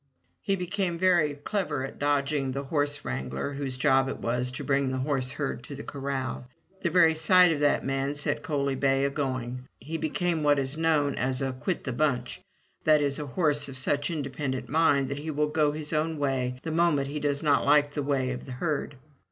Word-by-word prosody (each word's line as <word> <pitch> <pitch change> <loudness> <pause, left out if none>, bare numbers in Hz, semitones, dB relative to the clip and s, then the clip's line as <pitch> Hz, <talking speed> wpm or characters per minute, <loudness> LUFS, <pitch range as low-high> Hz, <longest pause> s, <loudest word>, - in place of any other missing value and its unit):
He 195 -2 0
became 180 -1 -2
very 170 -5 +3
clever 150 -2 -2
at - - -10
dodging 145 -1 0
the 140 +1 -3
horse 145 0 -1
wrangler 65 - -3
whose 135 -2 -4
job 135 +1 +3
it - - -4
was 125 +2 -1
to - - -5
bring 140 -1 +1
the 130 - -2
horseherd 135 +1 -2
to 145 - -8
the 140 - -7
corral. 135 -2 -4 0.3
The 170 - +1
very 165 -1 +5
sight 175 +3 +5
of 155 - -1
that 145 0 +2
man 135 +1 -1
set 145 - -1
Coaly 140 -4 -1
bay 135 0 +2
a 140 - 0
going. 130 -3 -3
He 160 +6 -5
became 165 +1 0
what 145 -1 +4
is 135 +1 -2
known 155 -3 +2
as 130 0 -1
a 135 -1 -1
"Quit 145 +8 -3
the 130 - -3
bunch'* 125 -3 -1 0.2
— - - -41
that 155 -1 +6
is 140 -1 0
a 150 - -4
horse 145 0 +1
of 135 - -7
such 145 +2 0
independent 135 -5 -3
mind 145 -2 +3
that 140 +1 -3
he 155 +2 -5
will 150 0 0
go 150 -1 +2
his 150 +1 -5
own 155 +1 0
way 130 -3 -1
the 160 - -3
moment 160 -4 +2
he 150 +1 -3
does 145 0 -1
not 145 -2 +3
like 145 0 +4
the 145 - -2
way 135 -2 0
of 125 +1 -6
the 130 - -6
herd. 145 0 -2
145 Hz, 210 wpm, -27 LUFS, 135-155 Hz, 0.3 s, that